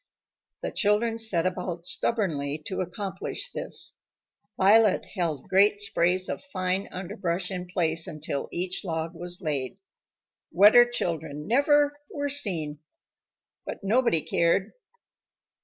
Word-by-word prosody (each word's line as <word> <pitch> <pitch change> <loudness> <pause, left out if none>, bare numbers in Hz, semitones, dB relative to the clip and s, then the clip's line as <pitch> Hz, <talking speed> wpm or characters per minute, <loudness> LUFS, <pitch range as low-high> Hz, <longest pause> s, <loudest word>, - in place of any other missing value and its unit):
The - - -2
children 225 +2 +1
set 190 -7 +1
about 180 -2 -3
stubbornly 165 -8 -1
to 190 - -3
accomplish 195 - -4
this. - - -5 0.6
Violet 205 +1 +5
held 165 -8 -2
great 200 +2 +4
sprays 185 -2 +1
of - - -4
fine 185 -6 -2
underbrush 185 -1 -3
in 180 -1 -4
place 165 -2 0
until 150 -2 -4
each 180 +1 -1
log 165 -2 -3
was 175 +2 -5
laid. 140 -5 -2 0.7
Wetter 220 +6 +7
children 160 -9 -3
never 290 - +3
were 285 -7 -3
seen. 165 - +1 0.8
But - - -7
nobody 220 -5 +3
cared. 170 +4 +1
185 Hz, 115 wpm, -27 LUFS, 170-210 Hz, 0.8 s, Wetter